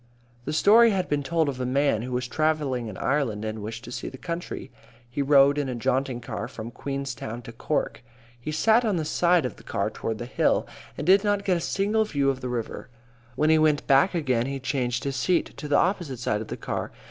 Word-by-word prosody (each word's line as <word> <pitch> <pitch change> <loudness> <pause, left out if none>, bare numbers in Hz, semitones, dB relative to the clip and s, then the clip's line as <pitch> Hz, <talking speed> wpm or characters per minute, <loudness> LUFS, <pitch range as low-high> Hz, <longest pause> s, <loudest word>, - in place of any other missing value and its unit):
A - - -1
story 220 +9 +6
has 190 -4 0
been 145 -3 -1
told 160 +2 0
of 130 -2 -3
a - - 0
man 130 -2 +1
who 125 +2 -5
was 125 0 -1
travelling 145 -4 0
in 100 -4 -7
Ireland 125 -7 0
and 110 0 -4
wished 115 +3 -6
to 120 - -9
see - - -5
the 130 - -10
country. 170 +4 -5 0.4
He 120 +4 -3
rode 140 0 +5
in 140 -2 -1
a 125 - -3
jaunting 125 +1 -1
car 115 - -5
from 115 +1 -8
Queenstown 130 -4 -5
to 115 - -9
Cork. 120 +1 -2 0.4
He 135 +6 -5
sat 220 +9 +4
on 215 -4 +1
the 160 -3 -1
side 175 -1 +3
of 125 - -4
the - - -15
car - - -2
toward 110 -1 -4
the 120 - -5
hill 125 - +1 0.3
and - - -4
did 190 +3 +6
not 205 -1 0
get 190 -3 +3
a - - -4
single 205 +5 +1
view 140 -8 +1
of 130 -1 -7
the 125 - -4
river. 120 0 -4 0.5
When 155 +4 +3
he 160 - +5
went 155 -2 +2
back 140 +7 +4
again 130 -7 +1
he 135 0 -3
changed 125 -2 -1
his 140 -1 -2
seat 170 +6 0
to 150 - -6
the 145 - +3
opposite 175 -8 0
side 110 -3 -1
of 110 - -7
the - - -5
car. - - -4
140 Hz, 230 wpm, -26 LUFS, 125-160 Hz, 0.5 s, story